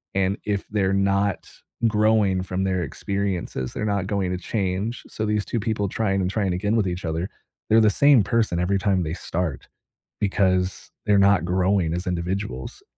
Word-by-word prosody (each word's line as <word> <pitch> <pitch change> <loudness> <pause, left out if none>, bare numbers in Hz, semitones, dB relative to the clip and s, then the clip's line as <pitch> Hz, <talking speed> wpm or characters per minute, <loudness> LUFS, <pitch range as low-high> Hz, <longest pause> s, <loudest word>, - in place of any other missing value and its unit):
and 95 +1 +1
if 100 -2 -2
they're 100 -2 +1
not 100 0 +1 0.4
growing 105 -3 +3
from 95 +1 -2
their 95 -2 0
experiences, 90 -5 -3
they're 105 - -3
not 100 -3 0
going 100 -3 -1
to 90 - -1
change, 100 +3 -2
so 110 - -4
these 105 -1 0
2 115 - -2
people 105 -2 -1
trying 95 -1 0
and 90 - 0
trying 100 -4 0
again 100 +4 0
with 105 -5 +2
each 90 +1 -4
other, 80 +3 -2 0.4
they're 110 +1 +6
the 110 - +5
same 140 +3 +5
person 110 -7 +1
every 95 +2 +1
time 95 -1 +1
they 80 - -3
start 85 -5 -3 0.5
because 95 -2 0
they're 105 -1 +4
not 100 -3 +4
growing 90 -2 +1
as 90 +1 -3
individuals. 90 -6 -3
95 Hz, 175 wpm, -24 LUFS, 90-105 Hz, 0.5 s, they're